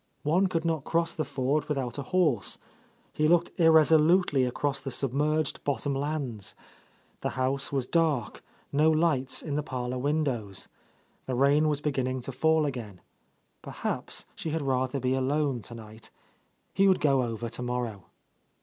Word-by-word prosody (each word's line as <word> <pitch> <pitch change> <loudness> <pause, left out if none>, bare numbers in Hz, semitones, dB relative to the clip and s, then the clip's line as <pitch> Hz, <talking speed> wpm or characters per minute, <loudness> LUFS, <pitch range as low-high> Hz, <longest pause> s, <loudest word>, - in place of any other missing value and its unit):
One 175 +6 +3
could 165 -2 -2
not 160 -4 0
cross 165 +1 0
the 155 - -2
ford 140 +2 -1
without 135 -3 -2
a 140 - -7
horse. 160 - +2 0.6
He 155 - +2
looked 175 +1 +3
irresolutely 160 -2 +5
across 140 +2 -1
the 135 - -5
sub 130 0 -2
merged 150 +1 0
bottom 140 0 -1
lands. 135 -7 -3 0.6
The - - -2
house 130 +1 -1
was 135 -3 0
dark, 150 -8 0 0.3
no 150 +3 +4
lights 155 -5 +1
in 150 - -4
the - - +1
parlour 125 -3 -4
windows. 130 -8 -1 0.6
The 130 - -1
rain 145 +4 +4
was 145 -1 -1
beginning 130 -3 -1
to 130 - -4
fall 160 +4 +2
again. 115 -9 -5 0.6
Perhaps - - -4
she 160 - -5
had 160 -1 -2
rather 130 0 0
be 130 0 0
alone 135 -1 0
tonight. 110 0 -10 0.6
He 195 +1 +4
would 190 - +4
go 140 -3 +3
over 115 -1 -3
to 120 +2 -4
morrow. 120 -6 -3
140 Hz, 155 wpm, -28 LUFS, 125-155 Hz, 0.6 s, irresolutely